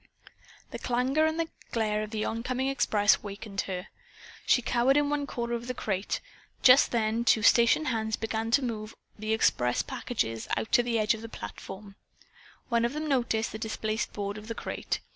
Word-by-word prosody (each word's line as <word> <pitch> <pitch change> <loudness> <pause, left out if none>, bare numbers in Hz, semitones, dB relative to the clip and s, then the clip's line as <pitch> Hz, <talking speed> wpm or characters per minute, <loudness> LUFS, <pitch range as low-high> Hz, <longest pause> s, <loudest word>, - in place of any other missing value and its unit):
The - - -6
clangor 260 +6 +1
and 325 +1 -1 0.2
glare 215 -3 0
of 215 - -4
the 215 -1 -2
oncoming 255 +3 -1
express 210 -6 +3
awakened 200 -1 -5
her. 180 -1 -4 0.6
She 250 - +4
cowered 245 +4 +3
in 290 0 +2
one 290 -1 -1
corner 235 -2 -3
of 235 0 -3
the 250 - -3
crate. 195 -3 -2 0.4
Just 255 +2 +7
then 225 0 0
two 220 -2 +3
station 235 +8 +5
hands 220 -5 0
began 225 0 -2
to 260 +4 +3
move 215 -2 -5 0.2
the 215 +1 -3
express 125 - +2
packages 225 - -3
out - - -3
to - - +6
the 240 -1 -1
edge 215 0 +3
of 220 - -7
the 230 - -8
platform. 195 - -9 0.7
One 235 -2 +1
of 240 +3 0
them 305 +1 -3
noticed 235 -5 +1
the 220 - -6
displaced 220 0 -2
board 205 0 -4
of 210 - -12
the 230 - -4
crate. - - -3
225 Hz, 180 wpm, -28 LUFS, 215-250 Hz, 0.7 s, Just